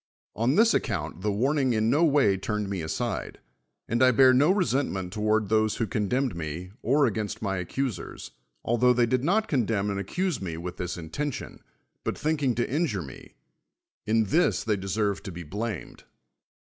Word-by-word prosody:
On 120 +7 +1
this 230 +3 +5
account 90 -3 -2
the 105 +2 0
warning 130 +4 +1
in 110 +1 +2
no 150 +5 +3
way 140 -11 +4
turned 105 +2 -2
me 95 -3 -2
aside; 80 - -3 0.5
and 115 +2 0
I 130 - +7
bear 130 +1 +6
no 145 +7 +5
resentiueiit 135 - 0
tou'ard 110 0 +1
those 110 -1 +2
Vv'ho 115 - -2
condemned 120 +3 0
me, 85 +3 -5
or 140 +4 +3
a^'ainst 110 -1 -3
my 95 -3 -1
accu 135 +9 -1
sers, 90 -5 -9 0.3
altlio 125 +2 +3
they 120 0 +4
did 125 +2 0
not 210 +8 +2
condeuui 110 - 0
and 100 - -2
accuse 175 - -2
me 85 -4 -4
with 90 +1 -6
this 90 0 -4
intention, 125 - -5 0.4
but - - -2
tliinking 150 -5 0
to 120 - 0
injure 140 - -1
me: 70 - -12 0.7
in 110 +1 +3
this 160 - +2
they 110 -2 +1
dcsei've 100 +1 -1
to 95 -4 -8
])e 90 - -6
blamed. 105 +4 -5
110 Hz, 175 wpm, -27 LUFS, 95-135 Hz, 0.7 s, I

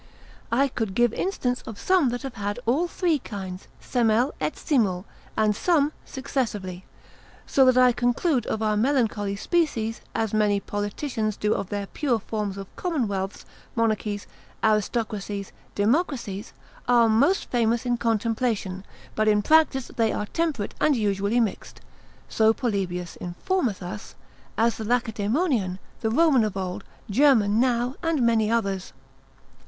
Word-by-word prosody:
I 270 +4 +3
could 220 -7 -3
give 240 0 +3
instance 250 -10 -1
of 220 - -7
some 370 -8 +3
that 245 +2 -4
have 270 -2 -5
had 205 0 -3
all 280 +10 +2
three 340 -3 0
kinds 190 -5 -7
semel 240 +2 +1
et - - -1
simul, 205 - +1 0.3
and 215 -1 +3
some 300 - +2
successively. 210 -9 -3 0.6
So 270 - +4
that 255 -1 +5
I 250 -1 +7
conclude 245 +2 +1
of 220 - -1
our 215 -1 +2
melancholy 215 -4 +1
species, 225 - 0
as 225 -2 -1
many 210 -2 +3
politicians 210 +2 -3
do 210 0 +1
of 195 - -3
their 205 -1 -3
pure 255 +3 0
forms 210 -3 -4
of 195 -1 -9
commonwealths, 205 - -2 0.3
monarchies, 215 -3 0 0.4
aristocracies, 210 -2 -1 0.2
democracies, 225 - 0 0.4
are 240 -2 +5
most 270 - +2
famous 235 0 +1
in 245 -1 +1
contemplation, 225 -4 -1 0.3
but 215 0 +1
in 210 -1 +3
practice 305 -4 +3
they 225 -2 +2
are 210 - -2
temperate 305 -5 -2
and 300 - +4
usually 205 0 +1
mixed, 225 -4 -2 0.5
(so 220 0 +3
Polybius 190 -8 -2
informeth 215 - -1
us) 195 +4 -7 0.4
as 230 +1 +2
the 220 - -4
Lacedaemonian, 225 - 0 0.2
the 220 - 0
Roman 275 -1 +4
of 210 -2 -2
old, 185 -1 -4 0.2
German 220 -3 +4
now, 245 0 +1
and 325 -6 +1
many 225 -2 +3
others. 195 -5 -1
225 Hz, 140 wpm, -25 LUFS, 205-255 Hz, 0.6 s, I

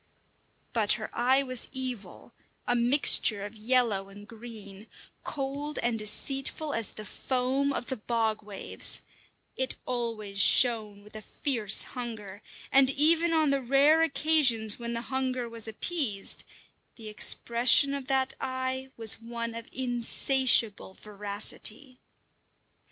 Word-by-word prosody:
But 220 -3 +3
her 215 -2 -5
eye 260 +3 +2
was 255 -3 0
evil, 255 -5 -6 0.3
a 245 - 0
mixture 235 -4 +4
of 210 +2 -10
yellow 220 -3 0
and 205 +1 -14
green, 220 -3 -12 0.4
cold 285 +1 -5
and 235 -2 -1
deceitful 270 +7 0
as 230 -3 +3
the 215 - -9
foam 260 +4 -2
of 260 - -4
the 260 - -4
bog 220 -1 -2
waves; 205 -2 0 0.5
it 260 0 -2
always 225 -5 -3
shone 215 -5 +3
with 210 +1 -17
a 215 - -7
fierce 220 -3 +1
hunger, 220 -5 -8 0.3
and 270 -1 +5
even 325 +4 +3
on 315 -3 +2
the 275 -1 0
rare 280 +5 +3
occasions 275 -8 +2
when 235 0 -5
the 235 - -4
hunger 255 -2 -2
was 230 -1 -3
appeased, 220 - -2 0.5
the 225 -2 -12
expression 240 +5 +3
of 275 -2 -6
that 265 -1 0
eye 260 0 -4
was 225 -1 +1
one 230 0 -6
of 230 0 -9
insatiable 245 -4 0
voracity. 210 +5 -4
240 Hz, 130 wpm, -27 LUFS, 215-265 Hz, 0.5 s, and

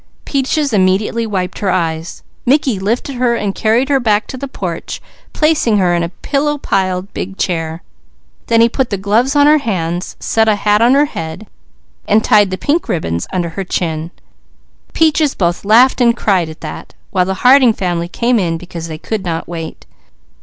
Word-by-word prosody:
Peaches 275 0 0
immediately 205 +4 +1
wiped 185 -4 -3
her 200 - -1
eyes. 165 -2 -2 0.2
Mickey 260 -5 +2
lifted 235 +7 -2
and 235 -5 +1
carried 230 +5 +1
her 280 -1 +2
back 215 -3 +1
to - - -8
the 275 +2 -5
porch, 180 -10 -5 0.3
placing 305 -8 +2
her 180 -3 +2
in 170 - +1
a 170 - -2
pillow 295 - -1
piled 190 -6 -1
big 190 +1 -5
chair. 165 -2 -2 0.6
Then 230 0 +4
he 230 - +6
put 255 +1 -1
the 200 - -2
gloves 220 +8 +1
on 285 0 +5
her 305 +1 +5
hands, 180 - -3
set 225 0 +1
a 215 - +4
hat 210 +1 +2
on 245 +3 +5
her 290 +1 +4
head 165 - -6 0.6
and 215 +1 +3
tied 205 -2 +4
the 185 - -3
pink 295 - -1
ribbons. 85 - -2 1.7
Peaches 310 -2 +2
both 175 -2 -1
laughed 240 +6 +4
and 235 -1 +3
cried 185 -8 +1
at 160 - -11
that, 155 - -8 0.2
while 180 -2 +2
the 190 +1 -2
Harding 255 -2 +7
family 175 -4 -2
came 235 +6 +1
in 165 -4 -1
because 170 -1 -8
they 160 -1 -6
could 210 +5 -4
not 165 -3 -3
wait. 165 -2 -7
205 Hz, 175 wpm, -15 LUFS, 180-250 Hz, 1.7 s, Harding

